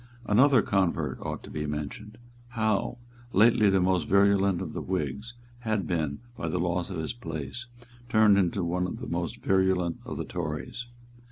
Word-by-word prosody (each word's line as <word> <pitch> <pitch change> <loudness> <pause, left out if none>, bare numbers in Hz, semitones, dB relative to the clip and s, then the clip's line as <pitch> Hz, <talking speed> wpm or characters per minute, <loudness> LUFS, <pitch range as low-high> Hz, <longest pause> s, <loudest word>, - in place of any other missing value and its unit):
Another 130 +3 +5
convert 95 -4 0
ought - - -5
to - - -11
be 75 -1 -3
mentioned. 75 +9 -5 0.4
Howe, 110 -1 0 0.4
lately 105 0 +5
the 95 0 +3
most 90 -3 +1
virulent 100 -1 +4
of 90 -5 -5
the - - -4
Whigs, 95 - -3 0.2
had 110 -6 -1
been, 80 -3 -2
by 85 - -4
the 90 - -1
loss 90 +1 -1
of 95 - -5
his 80 -1 -3
place, 120 - -6 0.4
turned 110 -2 +5
into 95 0 +1
one 90 +2 0
of - - -5
the - - -6
most - - -3
virulent 95 -3 +2
of - - -6
the - - -3
Tories. 85 +9 -5
95 Hz, 170 wpm, -28 LUFS, 85-105 Hz, 0.4 s, Another